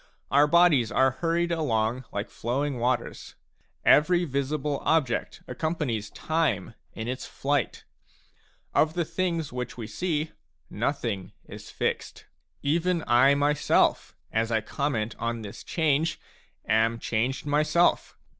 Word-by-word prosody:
Our 145 +2 +5
bodies 150 -8 +4
are 130 0 +3
hurried 170 +1 +1
along 125 -6 0
like 100 +1 -4
flowing 130 +3 -2
waters; 120 0 -2 0.5
every 175 +4 +5
visible 140 0 -2
object 145 -7 0
accompanies 125 -7 -2
time 155 - -1 0.2
in 110 0 -5
its 130 +1 -4
flight; 140 -3 -1 0.9
of 155 +1 +2
the 175 -2 0
things 170 -5 -2
which 125 0 -5
we 115 - -5
see, 155 +7 -2 0.4
nothing 115 -5 -2
is - - -10
fixed. - - -3 0.4
Even 170 +3 +1
I 130 +4 +5
myself, 145 +1 +2 0.2
as 115 +1 0
I 110 - +3
comment 115 -1 -2
on 115 -1 -2
this 100 - -9
change, 160 0 0 0.5
am 110 +1 +2
changed 120 +5 -1
myself. 155 +4 +2
140 Hz, 120 wpm, -27 LUFS, 115-160 Hz, 0.9 s, Our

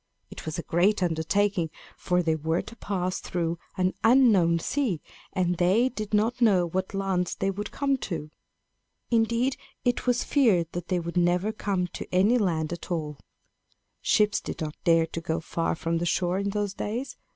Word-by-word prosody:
It - - -9
was 155 - -3
a 170 - -3
great 190 +4 +2
undertaking; 175 +2 +1 0.3
for 180 -1 0
they 160 -1 +2
were 160 +2 -1
to 230 - -11
pass 185 -4 -2
through 170 -1 -2 0.2
an 185 0 +1
unknown 225 -9 +5
sea, 215 - -1 0.3
and 180 -1 0
they 200 +8 +4
did 215 -5 -6
not 225 +4 +1
know 195 -6 +5
what 185 +3 -3
lands 190 -2 0
they 195 - 0
would 205 +1 -5
come 275 -1 0
to. 155 -4 -4 0.8
Indeed, 235 +3 +2 0.3
it 245 +1 0
was 245 0 +2
feared 195 - +3
that 175 -1 -5
they 180 -2 +1
would 170 +1 -5
never 175 +4 +2
come 200 -4 -1
to - - -8
any 205 +7 +4
land 165 -5 0
at 170 - -8
all. 155 -4 -3 0.8
Ships 210 -1 +3
did - - -6
not 155 -1 -3
dare 165 -1 +4
to 165 - -6
go 160 0 -1
far 165 +1 -2
from 165 +1 -1
the 175 - -1
shore 180 +2 +1
in 200 0 -1
those 205 -1 -2
days. 235 +6 -4
185 Hz, 180 wpm, -27 LUFS, 170-215 Hz, 0.8 s, unknown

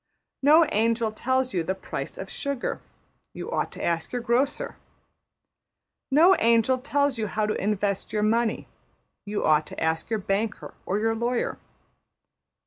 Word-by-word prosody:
No 310 +4 +6
angel 225 +1 +1
tells 260 +3 0
you 180 - +1
the 190 +3 -2
price 190 - -6
of - - -6
sugar; 280 -3 -3 0.5
you - - -6
ought - - -1
to - - -7
ask 165 -1 -1
your 245 - -2
grocer. 250 +4 0 1.3
No 330 +7 +6
angel 230 +3 +3
tells 285 -1 0
you 215 - -1
how 210 +2 -1
to 210 - 0
invest 200 -1 -1
your 210 -1 0
money; 225 +1 +1 0.6
you 205 0 -2
ought 155 0 +3
to - - -8
ask 160 +2 -1
your 225 - +1
banker 210 +2 -2
or 195 - 0
your 225 +1 +1
lawyer. 235 +2 -1
225 Hz, 150 wpm, -26 LUFS, 205-255 Hz, 1.3 s, No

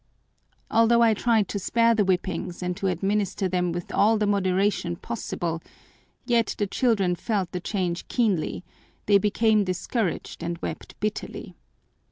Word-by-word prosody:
Although 230 +1 +5
I 225 -1 +5
tried 220 -1 +2
to 200 - -2
spare 230 +4 +3
the 220 -2 +2
whippings 185 -1 -2
and 180 0 -2
to 195 - -1
administer 195 +2 0
them 180 -1 0
with 175 0 -5
all 220 +2 +4
the 210 - +1
moderation 195 -2 +1
possible, 170 -4 -4 0.6
yet 235 -2 +1
the 205 - +1
children 200 -4 +1
felt 195 0 -2
the 180 - -3
change 180 -2 -2
keenly, 205 -8 0 0.4
they 200 -1 +5
became 215 +1 +3
discouraged 185 +1 -2
and 170 0 -3
wept - - -7
bitterly. 215 +1 -4
200 Hz, 145 wpm, -25 LUFS, 180-220 Hz, 0.6 s, Although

